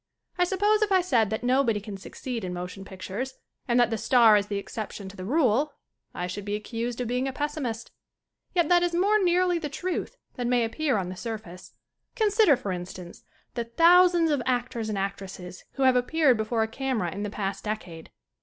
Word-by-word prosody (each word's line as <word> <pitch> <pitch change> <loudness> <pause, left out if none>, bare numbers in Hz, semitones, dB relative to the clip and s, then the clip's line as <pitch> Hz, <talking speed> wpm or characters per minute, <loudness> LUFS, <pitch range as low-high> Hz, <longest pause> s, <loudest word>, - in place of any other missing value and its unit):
I 360 - +2
suppose 410 +4 +2
if 420 -1 +1
I 375 -1 +5
said 240 - +2
that 220 +2 -3
nobody 250 -3 +2
can 205 0 -8
succeed 230 +4 -6
in 180 -1 -4
motion 180 +2 -6
pictures 200 +7 -6 0.3
and 240 0 +3
that 240 -1 +3
the 225 - -1
star 235 -4 +6
is 205 -1 +1
the 205 - -2
ex 200 - -7
ception 210 -3 -5
to - - -16
the 185 - -7
rule 280 - +2 0.4
I 180 - -4
should 185 +3 -5
be 205 +1 -2
accused 230 +3 -4
of 245 - -2
being 250 +3 -1
a - - -2
pessimist. 270 -6 -4 0.6
Yet 345 -3 +3
that 350 +1 +5
is 350 -1 0
more 405 +4 +3
nearly 355 0 +2
the 300 -3 -4
truth 365 - -4 0.2
than 245 -1 -1
may 245 -1 +3
appear 270 +3 0
on 185 -2 -2
the 185 - -6
surface. 210 -4 -7 0.4
Consider, 425 - +4
for 205 -6 -4
instance, 180 0 -7 0.3
the 235 -1 -3
thousands 340 +5 +5
of 285 -3 +1
act 250 0 -1
ors 225 -2 -3
and 210 - -2
actresses 190 -2 -6
who 275 - -1
have 260 -1 +5
appeared 265 +2 +3
before 220 +1 0
a - - -1
camera 225 -6 -2
in 200 - -5
the 210 - -2
past 200 -1 -4
decade. 190 -7 -5
240 Hz, 210 wpm, -26 LUFS, 205-300 Hz, 0.6 s, star